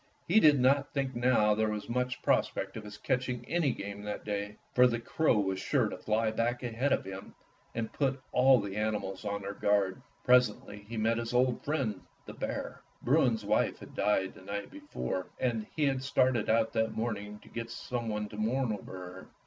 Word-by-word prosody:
He 200 +6 +6
did 150 -7 +6
not 140 +3 +3
think 135 -2 0
now 120 -3 +4
there 110 +1 +1
was 105 -1 -4
much 125 +1 -2
prospect 95 0 +1
of 110 - -6
his 105 0 -9
catching 125 -1 -1
any 160 -3 +2
game 100 -2 -6
that 105 0 -5
day, 105 0 -3 0.2
for 125 0 +7
the 120 -1 -1
crow 120 +2 +2
was 95 -2 0
sure - - +1
to - - -6
fly 110 +1 +1
back 120 +3 -1
ahead 125 +3 -1
of - - +1
him 95 0 -8 0.4
and 115 -1 -3
put 135 -2 0
all 130 0 +6
the 100 -1 -4
animals 105 -2 -2
on 100 -1 -2
their 100 +1 -4
guard. 100 -2 +1 0.2
Presently 125 -4 +3
he 115 - -5
met 115 +1 +1
«his 115 +1 -3
old 125 -1 +2
friend, 130 -10 -1 0.2
the - - -8
bear. - - -4 0.2
Bruin's 125 -6 +3
wife 105 - +1
had - - -12
died 95 -2 +1
the - - -14
night 100 +2 -5
before, 290 - -4
and 115 -4 -1
he 155 - 0
had 135 -2 +1
started 130 -3 +2
out 115 0 +2
that 110 0 0
morning 105 -2 -3
to - - -18
get 115 0 -6
some 120 0 -4
one 105 0 -2
to 105 - -9
mourn 115 +2 0
over 95 -2 -7
her. 90 0 -9
115 Hz, 200 wpm, -31 LUFS, 105-125 Hz, 0.4 s, for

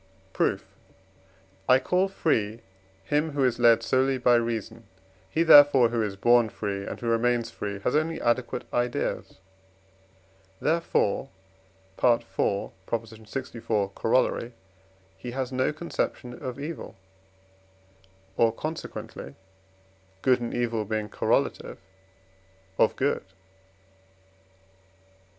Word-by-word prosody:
Proof. - - 0 1.0
I 130 - +8
call 180 +8 +1
free 115 - -1 0.4
him 150 +8 0
who 140 -1 +1
is 120 -1 0
led 115 -1 +5
solely 130 +3 +2
by 125 -1 +3
reason; 115 -1 -1 0.4
he, 165 - +1
therefore, 145 -6 +8
who 120 -1 -1
is 105 -2 -2
born 120 +2 +4
free, 100 -1 -4
and - - -6
who - - -7
remains 115 0 +1
free, 100 -1 -5
has 125 - 0
only 160 +2 0
adequate 120 +1 0
ideas; 120 0 -2 1.2
therefore 155 -7 0 0.7
(IV. 120 -2 +3
lxiv. 110 +1 -3
Coroll.) 120 +1 +1 0.7
he 125 - -6
has 130 -1 -2
no 130 +2 +1
conception 150 -5 -4
of 130 +1 -5
evil, 155 +4 -6 1.4
or 115 -1 +4
consequently 135 - -7 0.9
(good 130 -2 +3
and 120 - -3
evil 120 -2 -1
being 105 0 -3
correlative) - - 0 1.0
of - - +4
good. 140 +2 0
120 Hz, 105 wpm, -26 LUFS, 110-135 Hz, 1.4 s, I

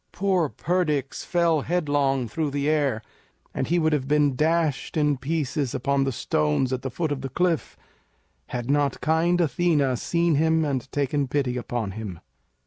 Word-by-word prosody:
Poor 185 -5 +1
Perdix 150 -6 -1
fell 170 -4 +2
headlong 145 -6 0
through 155 +6 -2
the 140 +1 -2
air, 145 -7 +1 0.5
and - - -2
he 175 - +2
would 160 -2 +2
have 135 -3 -1
been 145 -2 +3
dashed 160 0 0
in 150 -1 +3
pieces 140 -1 -2
upon 140 +1 +1
the 135 - 0
stones 75 - 0
at 130 - -2
the 135 - -3
foot 155 +4 -2
of 140 -2 -2
the 135 - -4
cliff 175 +1 -1 0.7
had 120 -1 -4
not 140 -1 +1
kind 165 +3 +2
Athena 150 -4 +2
seen 170 +6 +1
him 160 +2 +2
and 135 -2 -3
taken 145 0 0
pity 130 -2 -1
upon 120 -4 -3
him. 100 -4 -7
145 Hz, 165 wpm, -25 LUFS, 130-160 Hz, 0.7 s, been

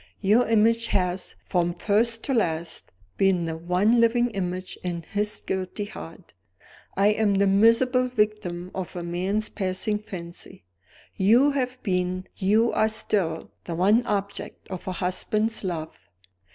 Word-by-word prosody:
Your 210 +5 +3
image 230 +1 +3
has, 180 -2 -1
from 175 -2 0
first 225 +5 +2
to 275 - -1
last, 170 -7 -1 0.3
been 190 -3 +2
the 160 -1 -3
one 180 +8 +2
living 240 +1 +3
image 185 -2 -4
in 175 -2 -3
his 210 +5 0
guilty 190 +2 -3
heart. 180 -4 -11 0.6
I 200 +1 +4
am 210 -1 +2
the 200 +1 +3
miserable 230 +6 +4
victim 210 -7 -1
of 185 -2 -5
a 175 - -4
man's 185 +5 -1
passing 200 +2 -2
fancy. 170 - -9 0.5
You 235 +9 +5
have 255 -2 -2
been, 185 -1 -1
you 215 +4 +2
are 220 - +2
still, 185 -7 -1
the 170 - -4
one 205 +7 +3
object 200 -1 -4
of 185 -1 -7
a 185 - -2
husband's 215 +5 -1
love. 165 -4 -5
195 Hz, 140 wpm, -25 LUFS, 180-220 Hz, 0.6 s, You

